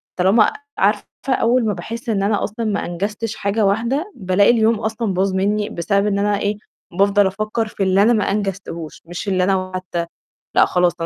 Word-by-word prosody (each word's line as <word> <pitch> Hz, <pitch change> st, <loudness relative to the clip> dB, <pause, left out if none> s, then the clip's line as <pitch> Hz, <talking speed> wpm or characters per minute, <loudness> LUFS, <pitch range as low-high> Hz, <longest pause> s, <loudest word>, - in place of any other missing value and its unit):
طالما 195 Hz, +4 st, +4 dB, 0.2 s
عارفة 205 Hz, +2 st, +2 dB, 0.3 s
أول 245 Hz, -1 st, +2 dB
ما 210 Hz, -, +1 dB
باحس 230 Hz, +7 st, -6 dB
إن 195 Hz, -3 st, +1 dB
أنا 205 Hz, 0 st, +1 dB
أصلًا 220 Hz, +2 st, -3 dB
ما 205 Hz, -1 st, -1 dB
أنجزتش 205 Hz, +5 st, -3 dB
حاجة 205 Hz, +1 st, 0 dB
واحدة، 240 Hz, -, 0 dB
بالاقي 190 Hz, -1 st, +3 dB
اليوم 225 Hz, -2 st, +2 dB
أصلًا 220 Hz, -2 st, -2 dB
باظ 190 Hz, +1 st, 0 dB
منّي 205 Hz, +2 st, 0 dB
بسبب 200 Hz, +4 st, 0 dB
إن 200 Hz, -1 st, 0 dB
أنا 205 Hz, 0 st, +1 dB
إيه، 205 Hz, 0 st, -1 dB, 0.3 s
بافضل 200 Hz, +2 st, +3 dB
أفكّر 215 Hz, +3 st, -2 dB
في 210 Hz, -, -3 dB
اللي 190 Hz, +1 st, +3 dB
أنا 225 Hz, +4 st, +5 dB
ما 215 Hz, -3 st, +2 dB
أنجزتهوش، 195 Hz, -5 st, -4 dB
مش 175 Hz, +4 st, -7 dB
اللي 185 Hz, -2 st, +1 dB
أنا 185 Hz, -1 st, 0 dB
حتى 175 Hz, -2 st, -3 dB, 0.5 s
لأ، -, -, +6 dB
خلاص 180 Hz, -1 st, +2 dB
205 Hz, 185 wpm, -20 LUFS, 190-220 Hz, 0.5 s, لأ